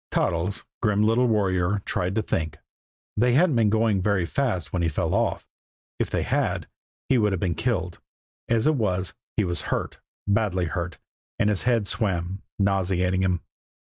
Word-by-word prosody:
Toddles, 85 +4 0 0.2
grim 105 -2 +2
little 115 +3 +3
warrior, 100 -3 +1
tried 90 +1 -1
to 110 - +1
think. 80 -1 -2 0.6
They 120 +3 +3
hadn't 160 +1 +4
been 115 -3 +4
going 110 -2 +2
very 95 -2 +1
fast 110 - -1
when 90 - 0
he 85 - +2
fell 75 - -1
off. - - 0 0.5
If - - 0
they - - 0
had, - - 0 0.4
he 130 - +3
would 105 -2 +2
have 95 - -1
been 90 -2 0
killed. 90 -3 -2 0.5
As 115 -1 +2
it 155 - +4
was, 95 -8 0 0.2
he 105 - +3
was 90 -2 0
hurt, - - -2 0.3
badly 100 -3 +1
hurt, 85 0 -3 0.4
and 105 - +2
his 100 - +1
head 115 -4 +2
swam, 95 -3 -1 0.2
nauseating 95 -2 +1
him. 90 -2 +1
100 Hz, 170 wpm, -25 LUFS, 90-110 Hz, 0.6 s, hadn't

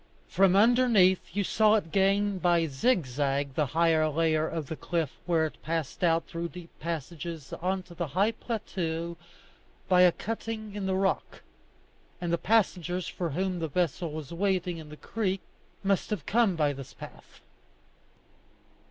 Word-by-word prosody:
From 190 -1 +4
underneath 220 -4 +5
you 200 +3 0
saw 215 +2 +4
it 180 -7 -1
gain 195 0 +2
by 175 -2 +3
zigzag 140 - 0
the 150 +1 +1
higher 160 +1 +3
layer 155 0 +1
of 160 -3 -3
the 160 - -5
cliff 165 -3 -2 0.2
where 165 -2 +3
it 155 - -7
passed 165 0 -3
out 165 -1 +3
through 170 0 -4
deep 175 -1 -11
passages 165 -1 -5
on 185 +1 -1
to 180 - -14
the 170 -1 -3
high 195 +9 +2
plateau 170 -8 -3 0.7
by 180 -1 +5
a 180 -1 +7
cutting 220 +1 -5
in 200 -2 -3
the 190 - +1
rock; 195 0 -1 0.8
and 175 -1 -2
the 170 - +1
passengers 185 -5 +1
for 175 -2 -3
whom 180 +4 -1
the 165 - -1
vessel 170 +1 -1
was 155 0 -7
waiting 180 -2 0
in 155 -1 -10
the 150 - -10
creek 195 -1 -2 0.4
must 195 -1 +1
have 200 -9 -3
come 220 -4 +3
by 150 -3 +1
this 135 -1 -10
path. - - -12
175 Hz, 160 wpm, -28 LUFS, 160-195 Hz, 0.8 s, a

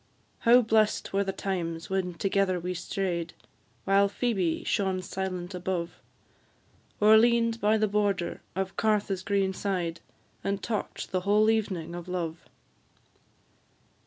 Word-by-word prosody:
How 245 +2 +6
blest 215 -2 +1
were 200 +1 +2
the 195 - -2
times 170 -4 -3
when 185 -2 -2
together 195 +1 +1
we 180 +1 -3
stray'd, 180 -1 -3 0.5
While 200 +1 +4
Phoebe 195 -7 -1
shone 190 -2 0
silent 185 -1 -4
above, 180 -1 -3 1.0
Or 215 +1 +7
lean'd 230 0 +2
by 215 +1 +3
the 215 0 +2
border 200 -3 0
of 190 0 -2
Cartha's 205 -3 +1
green 195 -1 0
side, 180 -4 -2 0.4
And 200 0 -2
talk'd 215 -3 -4
the 185 - +1
whole 210 +4 +3
evening 190 -7 -2
of 175 0 -7
love! 170 -2 -4
195 Hz, 130 wpm, -28 LUFS, 180-210 Hz, 1.0 s, Or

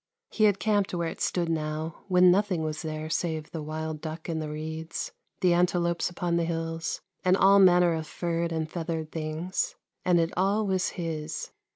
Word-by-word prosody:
He 215 - +3
had 205 -2 +4
camped 205 -4 +1
where 170 -1 -1
it - - -9
stood 175 -2 0
now, 155 0 -3
when 180 -1 +6
nothing 190 -3 +2
was 155 -1 -3
there 155 0 -4
save 160 -1 -2
the 160 - -4
wild 155 0 -4
duck 160 0 -6
in 165 -2 -2
the 155 -1 -4
reeds, 160 +2 -5 0.3
the 180 -2 +4
antelopes 175 -1 +2
upon 175 -1 -1
the 170 - +2
hills, 165 -1 -3 0.2
and 185 +1 +4
all 200 +1 +6
manner 180 -2 +6
of 160 -1 -3
furred 170 0 -2
and 160 -1 -1
feathered 160 -1 -4
things; 160 +3 -2 0.3
and 175 -1 +4
it 165 0 0
all 200 +4 +2
was 190 -2 +1
his. 160 -3 -4
165 Hz, 185 wpm, -28 LUFS, 160-180 Hz, 0.3 s, when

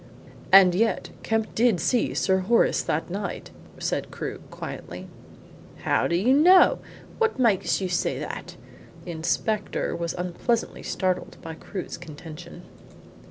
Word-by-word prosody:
"And 190 -2 +8
yet 225 +5 0
Kemp 225 -1 -1
did 225 -5 +3
see 235 - +1
Sir 190 0 +2
Horace 230 +6 +3
that - - -2
night," - - -5 0.3
said - - -2
Crewe - - -6
quietly. - - -8 0.8
"How - - +2
do 170 - 0
you 220 +9 +3
know? 360 +6 +6 0.4
What 450 -6 +1
makes 230 -7 +2
you 190 - -1
say 180 - -1
that?" - - -7 0.5
The 175 - -5
inspector 200 +6 -1
was 170 0 -3
unpleasantly 180 +6 -2
startled 185 -2 -2
by 165 -1 -6
Crewe's 180 +2 -7
contention. 165 +1 -10
190 Hz, 130 wpm, -25 LUFS, 175-230 Hz, 0.8 s, And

